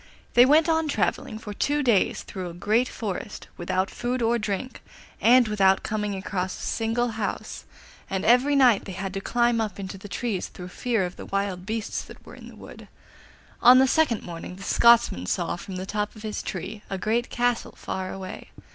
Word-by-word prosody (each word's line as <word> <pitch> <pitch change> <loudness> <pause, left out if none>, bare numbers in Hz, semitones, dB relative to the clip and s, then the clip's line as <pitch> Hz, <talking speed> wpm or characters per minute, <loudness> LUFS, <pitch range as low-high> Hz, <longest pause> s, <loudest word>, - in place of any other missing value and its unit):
They 245 +1 +7
went 305 +3 +5
on 320 -1 +2
travelling 215 -4 -1
for 215 -1 -7
two 290 +7 0
days 230 -7 +2
through 185 -2 -6
a 170 - -10
great 215 +7 +1
forest, 205 -1 -5
without 185 +2 -1
food 245 +1 -2
or 235 +1 +2
drink, 210 +4 -4 0.4
and 245 +1 +6
without 195 -2 +3
coming 210 -2 -2
across 190 -1 -3
a - - -6
single 230 +2 0
house, 220 -2 -4 0.4
and 190 -1 -2
every 250 +5 +4
night 250 -6 +5
they 195 - -6
had 190 +1 -5
to 195 - -3
climb 240 +1 +1
up 210 -3 -4
into 195 0 -6
the 205 - -10
trees 200 -1 -2
through 180 0 -10
fear 225 0 -1
of 180 - -7
the - - -9
wild 195 -2 -2
beasts 220 0 -3
that - - -14
were - - -12
in - - -12
the - - -13
wood. - - -12 0.7
On 250 +1 +8
the 265 - +6
second 265 -5 +2
morning 170 +1 -7
the 195 - -10
Scotsman 230 - +4
saw 170 - -1
from 185 +2 -8
the 185 +1 -4
top 210 +2 -3
of 215 - -12
his 215 -1 -3
tree 190 +3 -6
a 195 - -3
great 230 +5 0
castle 245 -1 -1
far 185 0 -4
away. 190 -1 -8
210 Hz, 200 wpm, -25 LUFS, 190-240 Hz, 0.7 s, On